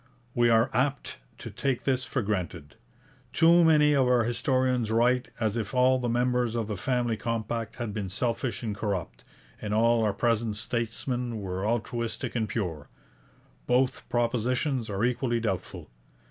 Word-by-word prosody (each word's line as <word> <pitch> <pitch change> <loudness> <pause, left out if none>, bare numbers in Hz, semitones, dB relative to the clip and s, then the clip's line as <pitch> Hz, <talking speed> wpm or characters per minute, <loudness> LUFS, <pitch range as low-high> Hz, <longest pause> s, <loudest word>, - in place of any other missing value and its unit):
We 120 0 +3
are 115 +3 +3
apt 135 - -1 0.2
to - - -8
take 135 -3 -2
this 130 -1 0
for 130 - -2
granted. 90 -7 -3 0.6
Too 170 +1 +6
many 150 -2 +5
of 135 -3 +3
our 125 -1 +4
historians 125 0 0
write 120 +2 +2
as 110 -2 0
if 115 +1 -3
all 130 +1 +4
the 120 -1 -2
members 120 -1 +1
of 115 -3 -1
the 105 - -3
Family 120 +3 0
Compact 115 +1 -3
had 120 -4 -4
been 100 -3 -3
selfish 120 +5 -2
and 105 -3 -3
corrupt, 100 -4 -4 0.4
and 105 0 -2
all 115 +1 +3
our 105 - +2
present 115 0 0
statesmen 120 +2 -3
were 95 0 -3
altruistic 115 0 -2
and 110 -2 -1
pure. 80 -9 -4 0.8
Both 125 +1 +1
propositions 120 +1 0
are 100 +1 -2
equally 120 -1 0
doubtful. 100 -5 -4
120 Hz, 155 wpm, -27 LUFS, 110-125 Hz, 0.8 s, Too